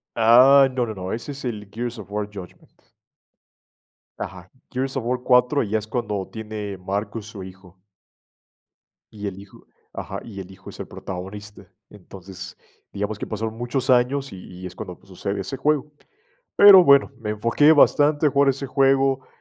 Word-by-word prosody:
Ah, 130 +4 +7
no, 130 -1 -1
no, 110 - -5
no, 95 -1 -6
ese 120 +6 -5
es 140 0 -10
el 105 -4 -5
Gears 120 +1 -5
of 105 -2 -10
War 105 0 -2
Judgment. 95 -3 -12 1.5
Ajá, 90 0 -8 0.2
Gears 130 +1 -3
of 130 - -2
War 125 +1 -1
4, 125 +3 +3
y 105 - -5
ya 110 - +1
es 110 - -7
cuando 105 -4 -3
tiene 105 -2 -6
Marcus, 100 +3 -4
su 105 -3 -9
hijo. 95 0 -13 1.3
Y 105 -1 -7
el 95 - -8
hijo 100 -1 -15 0.3
ajá, - - -6
y 100 -4 -9
el 95 -1 -10
hijo 95 0 -12
es - - -13
el - - -6
protagonista. 100 +1 -9 0.2
Entonces, 95 -1 -11 0.4
digamos 105 +1 -4
que - - -5
pasaron 110 0 -4
muchos 125 +3 -2
años 130 +3 +2
y 95 - -9 0.2
y - - -6
es 90 - -9
cuando 90 -1 -8
pues, - - -25
sucede 100 +2 -4
ese 115 +8 -6
juego. 150 +1 0 0.6
Pero 195 -3 +9
bueno, 140 -2 +5
me 105 - -4
enfoqué 115 +8 +3
bastante 150 0 +4
jugar 140 0 +3
ese 135 +1 -5
juego, 135 0 +2
110 Hz, 175 wpm, -22 LUFS, 100-135 Hz, 1.5 s, Pero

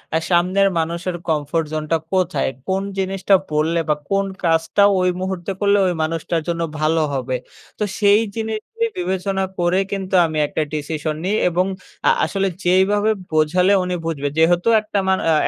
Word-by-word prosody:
আ - - +5
সামনের 185 +3 +3
মানুষের 170 +2 -2
কমফোর্ট 155 +1 0
জোনটা 155 +1 0 0.2
কোথায়? 185 -5 +1 0.2
কোন 190 +1 0 0.2
জিনিসটা 195 +1 +2 0.2
বললে? 155 +3 +1
বা 150 - +3
কোন 195 0 +1 0.2
কাজটা 165 +3 +2 0.2
ঐ - - +1 0.2
মুহূর্তে 190 0 -3
করলে 205 0 +3
ঐ - - +3 0.2
মানুষটার 165 +1 -2
জন্য 170 -1 -1 0.2
ভালো 160 +1 +2
হবে? 130 -1 -2 0.4
তো - - +1 0.2
সেই 205 0 +5
জিনিসটি 225 - -3
বিবেচনা 190 +2 -1 0.2
করে 175 +2 +2
কিন্তু 195 -1 -2
আমি 160 -1 -3
একটা 155 - -2
ডিসিশন 155 0 -3
নিই 200 +3 +1
এবং 180 +2 +1 0.4
আ - - +7 0.2
আসলে 195 -1 -1 0.2
যেইভাবে 195 +4 +3 0.2
বোঝালে 170 +5 +3
উনি 180 0 -2
বুঝবে। 145 -4 -2
যেহেতু 175 +4 +3
একটা 210 -1 -2
মানু 190 0 +2
আ - - +4
180 Hz, 160 wpm, -20 LUFS, 160-195 Hz, 0.4 s, আ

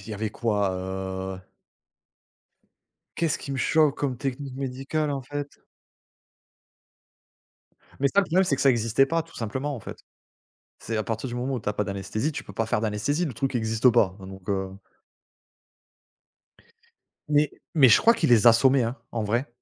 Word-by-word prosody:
il - - -13
y 110 - -4
avait 105 +1 -3
quoi, 105 -4 0
heu 95 0 -5 1.8
Qu'est 165 -1 +1
ce - - -1
qui 140 - -6
me 135 - -2
choque 155 0 +3
comme 135 -3 -1
technique 135 +1 -4
médicale, 135 +3 -2
en 140 -2 -3
fait? 145 +2 -5 2.5
Mais 140 - +3
ça, 200 - +4
le - - -1
problème, 185 +2 +2
c'est 140 -7 +1
que - - -2
ça 135 - +6
existait 115 +2 +2
pas, 165 +2 0
tout 165 - -20
simplement 130 +6 -3
en 125 - -7
fait. - - -9 0.8
C'est 115 - -3
à 110 - 0
partir 115 +3 -4
du 120 - -5
moment 125 +2 -2
où 125 - -3
tu 105 - -3
as - - -2
pas 105 - -1
d'anesthésie, 100 - -3
tu 145 - -6
peux - - -11
pas 115 - -1
faire 110 -1 0
d'anesthésie, 115 +10 -1
le 140 - -4
truc 130 +3 -2
existe 110 +1 +3
pas, 105 -6 +2
hein, 95 - -10
donc 95 -1 -11
heu, 95 -1 -1 2.6
Mais 150 0 +3 0.2
mais 140 -5 +7
je 115 - +7
crois 230 - +5
qu'ils 160 - 0
les 120 -1 +5
assommaient 130 +3 +6
hein, 120 +2 -2 0.2
en 115 - -2
vrai. 120 +6 -1
125 Hz, 185 wpm, -25 LUFS, 105-140 Hz, 2.6 s, mais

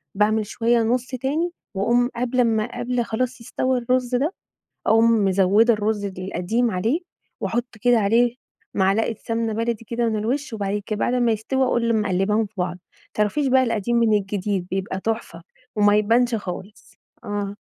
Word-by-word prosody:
باعمل 215 +1 +2
شوية 235 +2 +1
نُصّ 245 +2 0
تاني، 280 +7 -1 0.2
وأقوم 240 +5 +2
قبل 250 +1 -1
امّا 230 0 +1
قبل 245 0 0
خلاص 250 +2 -2
يستوى 255 +2 -1
الرز 250 +1 0
ده، 295 +8 0 0.5
أقوم 225 -1 +4
مزودة 200 +5 +4
الرز 210 -1 -1
القديم 195 +5 -1
عليه 225 - 0 0.4
وأحط 240 0 -2
كده 245 -1 +4
عليه 230 +4 +3 0.4
معلقة 200 +4 +2
سمنة 230 -1 -1
بلدي 230 +1 -2
كده 235 +1 -1
من 220 - -1
الوشّ، 250 +6 -2
وبعد 205 -1 -2
كده 215 -1 -3
بعد 245 - +1
امّا 240 -2 +2
يستوي 260 +5 0
أقوم 235 -3 +1
مقلّباهم 210 +2 +1
في 215 - -22
بعض، 180 0 -1
ما - - -13 0.4
تعرفيش 215 +7 +1
بقى 260 0 +4
القديم 230 0 0
من 230 -2 +3
الجديد 195 -1 -2
بيبقى 190 0 -3
تحفة، 220 -6 -3 0.3
وما 205 0 +5
يبانش 230 +3 +3
خالص، 200 0 -7 0.3
آه 205 0 -3
225 Hz, 160 wpm, -23 LUFS, 205-245 Hz, 0.5 s, وما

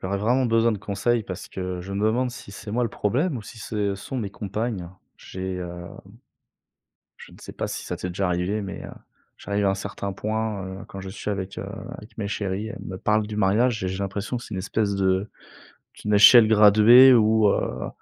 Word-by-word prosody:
j'aurais 95 +2 -1
vraiment 125 +5 +2
besoin 115 0 +3
de 105 - -4
conseils 105 +4 0
parce 95 -1 -7
que 90 -1 -5
je 100 +2 -7
me 100 +2 -1
demande 125 +3 +1
si 120 -4 -11
c'est 105 - -9
moi 120 +3 0
le 115 - +1
problème 135 - -1
ou 115 - -6
si 110 - -12
ce 105 -1 -2
sont 100 +7 -7
mes 105 -6 -3
compagnes, 105 -2 -4 0.3
j'ai 95 0 -6
heu, 90 -1 -7 1.3
je - - -14
ne - - -16
sais - - -9
pas - - -3
si - - -5
ça - - -3
t'est 90 - -5
déjà 95 +2 -1
arrivé 90 +4 -1
mais, 100 -1 -7
heu, - - -7 0.5
j'arrive 100 0 -2
à - - +4
un - - 0
certain 100 0 -5
point, 110 0 -3
heu, 95 +1 -8
quand 95 - -8
je 95 - -7
suis 105 +2 -5
avec, 95 -1 -4
heu, - - -5 0.3
avec 105 +3 -14
mes 100 -2 -2
chéries, 100 0 -3
elles 115 - -8
me 95 - -6
parlent 105 +2 +1
du 105 0 -6
mariage 110 +3 +2
et - - 0
j'ai 95 +1 -4
l'impression 100 +4 -3
que 120 - -6
c'est 110 - -8
une - - -3
espèce 100 +2 -1
de 95 +1 +1 0.7
d'une 105 - -3
échelle 110 +2 +8
graduée 110 +5 +8
où, 110 -2 +4
heu, - - -1
105 Hz, 220 wpm, -24 LUFS, 95-110 Hz, 1.3 s, échelle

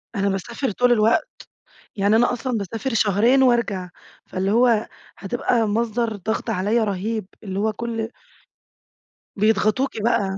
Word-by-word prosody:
أنا 200 0 +1
باسافر 230 +6 -3
طول 245 +4 +2
الوقت، 230 - +3 0.7
يعني 205 +2 +2
أنا 240 +2 +3
أصلًا 245 -1 -2
باسافر 225 +6 -4
شهرين 230 +5 +3
وارجع، 220 -7 +1 0.4
فاللي 190 +1 -2
هو 230 -1 +3 0.3
هتبقى 230 +2 0
مصدر 225 +1 -1
ضغط 215 +3 -3
عليّا 210 +5 +1
رهيب 210 +1 -2 0.2
اللي 195 -1 -4
هو 215 +1 0
كل 225 0 -4 1.3
بيضغطوكِ 215 +5 +2
بقى. 200 -4 +1
220 Hz, 125 wpm, -22 LUFS, 200-235 Hz, 1.3 s, الوقت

